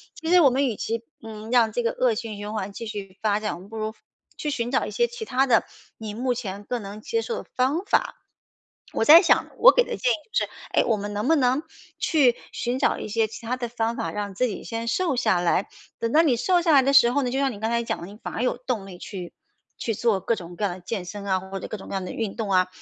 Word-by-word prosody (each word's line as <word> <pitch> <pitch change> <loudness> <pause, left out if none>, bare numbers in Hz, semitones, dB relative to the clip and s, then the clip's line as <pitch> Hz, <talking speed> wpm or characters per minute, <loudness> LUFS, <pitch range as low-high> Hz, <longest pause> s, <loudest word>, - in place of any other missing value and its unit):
其 325 +2 -4
实 360 - +8
我 285 - +7
们 265 +3 +1
与 240 -5 -1
其， 230 +2 -3 0.2
嗯， 220 0 -8
让 235 -3 +4
这 240 +3 -1
个 230 - +1
恶 250 -3 +1
性 220 -2 -5
循 205 +1 -6
环 200 -2 -4
继 230 +3 -6
续 195 -3 -7
发 210 -1 +2
展， 215 0 -2
我 - - -10
们 190 +3 -14
不 225 - -8
如， 215 0 -3 0.4
去 300 - -2
寻 240 -4 -2
找 265 - +1
一 - - -6
些 475 - +2
其 475 -2 -7
他 265 -7 +2
的， 240 -4 +4 0.3
你 215 -2 -6
目 250 +2 0
前 205 -5 -5
更 240 +2 -3
能 205 +2 -8
接 455 - -1
受 465 0 -4
的 - - -29
方 280 +9 +1
法。 - - +1 0.8
我 - - +1
在 320 +6 +10
想 345 - +3
我 - - +9
给 - - +4
的 - - -4
建 - - +2
议 - - +3 0.2
就 - - +2
是， - - -18 0.2
哎， - - +3
我 225 -3 +2
们 205 0 -5
能 210 +4 -2
不 325 - +6
能 260 +1 +2 0.4
去 270 -7 +3 0.2
寻 245 +1 -2
找 - - +2
一 - - -5
些 220 +1 +1
其 220 +2 -10
他 245 +3 -1
的 245 -1 -3
方 230 0 -1
法， 165 - -3
让 205 +1 -4
自 255 - +2
己 215 - -6
先 230 0 -4
瘦 320 +4 +1
下 215 -7 +2
来。 175 +2 +1 0.3
等 230 - -1
到 315 - +7
你 295 -7 +3
瘦 360 +6 +2
下 335 -1 +2
来 275 - +7
的 275 - +2
时 260 -4 +7
候 285 +3 +1
呢， 250 - 0
就 270 - 0
像 275 -1 +1
你 205 - -9
刚 220 - 0
才 235 0 +1
讲 - - -3
的， 170 - -7
你 205 +2 -12
反 - - -5
而 230 - -2
有 250 - 0
动 240 -6 -3
力 180 - -10
去 180 -2 -8 0.4
去 225 - -2
做 220 -2 +1
各 230 - +1
种 175 -3 -9
各 210 - -5
样 180 -3 -2
的 - - -11
健 190 +1 -4
身 200 +3 -7
啊， 190 -1 +1
或 190 +1 -7
者 - - -6
各 - - -5
种 195 - -11
各 - - -6
样 190 -1 -2
的 - - -5
运 220 -4 -3
动 220 -3 -3
啊。 185 -1 +4
230 Hz, 310 characters per minute, -25 LUFS, 205-255 Hz, 0.8 s, 在